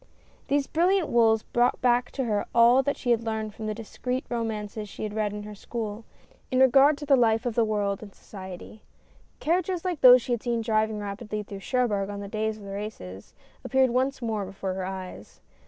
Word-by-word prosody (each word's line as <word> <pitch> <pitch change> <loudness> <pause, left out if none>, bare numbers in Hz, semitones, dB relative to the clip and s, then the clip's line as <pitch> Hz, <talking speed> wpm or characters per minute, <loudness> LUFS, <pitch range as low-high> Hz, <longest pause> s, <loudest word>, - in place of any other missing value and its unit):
These 285 0 +1
brilliant 355 +2 +1
wools 225 -2 +3
brought 240 +1 +1
back 245 0 +2
to 270 - -2
her 210 -4 -1
all 235 +3 +6
that 285 +2 -2
she 245 - -1
had 230 -1 +3
learned 220 -1 -3
from 220 - -6
the 215 - -2
discreet 250 +3 -4
romances 215 -3 -4
she - - -8
had 210 -1 -4
read 215 -1 -1
in 210 0 -6
her 210 0 -8
school, 220 +1 -6 0.4
in 255 - +1
regard 275 +3 +6
to 295 - -7
the 280 -1 +5
life 225 -1 +2
of 240 - -1
the 230 - +3
world 205 -2 -1
and 215 - -9
DREAMS. - - -25
41 - - -25
society. 190 +2 -10 0.6
Carriages 355 +2 0
like 355 -5 -2
those 250 -1 +8
she - - -5
had 240 -2 0
seen 235 -2 -1
driving 220 -1 0
rapidly 210 +1 -5
through 200 -1 -8
Cherbourg 205 -3 0
on 200 0 -5
the 200 - -6
days 215 +1 -2
of 210 - -13
the 200 - -8
races, 195 - -8 0.3
appeared 265 -2 +2
once 260 +1 0
more 220 -3 -1
before 195 0 -5
her 185 0 -4
eyes. 185 - -8
220 Hz, 215 wpm, -26 LUFS, 205-250 Hz, 0.6 s, those